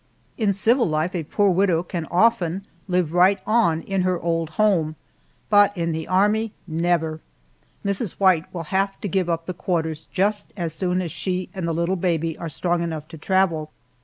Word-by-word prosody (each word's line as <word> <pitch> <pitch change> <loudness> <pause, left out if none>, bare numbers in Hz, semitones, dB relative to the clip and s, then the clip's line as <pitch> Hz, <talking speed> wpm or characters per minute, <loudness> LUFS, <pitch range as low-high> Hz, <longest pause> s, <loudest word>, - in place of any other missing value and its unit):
In 215 -4 +1
civil 230 +6 +3
life 155 +4 0
a 175 - -1
poor 200 +6 +2
widow 180 -2 +2
can 170 -3 -5
often 195 -2 +2 0.2
live 180 -4 0
right 185 +3 +5
on 205 -8 +2
in 195 -1 -1
her 180 -1 +1
old 165 -2 -1
home, 175 -8 +2 0.5
but 205 -1 +4
in 170 -1 0
the 160 0 -4
Army, 210 +4 +2
never! 165 -1 0 0.7
Mrs. 200 0 -1
White 185 -5 +2
will 170 -2 -5
have 195 +1 0
to - - -2
give 185 -2 0
up 165 -1 -1
the 185 - -4
quarters 160 -3 -2
just 205 +2 0
as 170 -4 -2
soon 180 +1 -1
as 170 - -5
she 185 -1 -3
and 185 -4 -3
the - - 0
little 170 +3 0
baby 165 -2 0
are 165 - -4
strong 175 +2 0
enough 160 -3 -4
to 160 - -9
travel. 170 -3 +1
180 Hz, 185 wpm, -23 LUFS, 165-195 Hz, 0.7 s, right